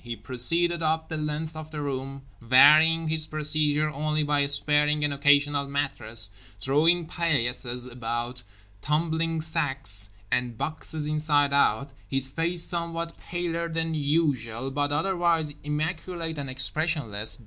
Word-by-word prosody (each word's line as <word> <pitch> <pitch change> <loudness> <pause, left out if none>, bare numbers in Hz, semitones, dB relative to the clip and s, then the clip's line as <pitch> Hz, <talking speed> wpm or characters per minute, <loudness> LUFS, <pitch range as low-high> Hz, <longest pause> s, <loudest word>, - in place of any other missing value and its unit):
He 120 -1 -5
proceeded 165 +9 +1
up 160 0 0
the 160 - -3
length 155 +1 -4
of 155 0 -8
the 155 -1 -7
room, 135 -1 -5 0.2
varying 155 +7 +6
his 155 -1 -2
procedure 150 0 0
only 150 +1 -1
by 145 -1 +1
sparing 150 +1 +3
an 145 - -1
occasional 145 0 +2
mattress, 115 -7 +1 0.3
throwing 160 +9 +2
paillasses 125 -7 -1
about, 120 0 -4 0.4
tumbling 160 +1 -1
sacs 135 -10 0 0.2
and 125 -2 -1
boxes 155 +2 -2
inside 150 -2 +1
out; 140 0 +2 0.2
his 135 0 0
face 170 +3 +1
somewhat 170 -1 -3
paler 170 -1 -3
than 165 0 -2
usual 140 -5 -1
but 145 +1 -1
otherwise 165 -1 0
immaculate 160 +2 -3
and 140 -2 -5
expressionless. 130 -5 -3
150 Hz, 125 wpm, -26 LUFS, 135-160 Hz, 0.4 s, varying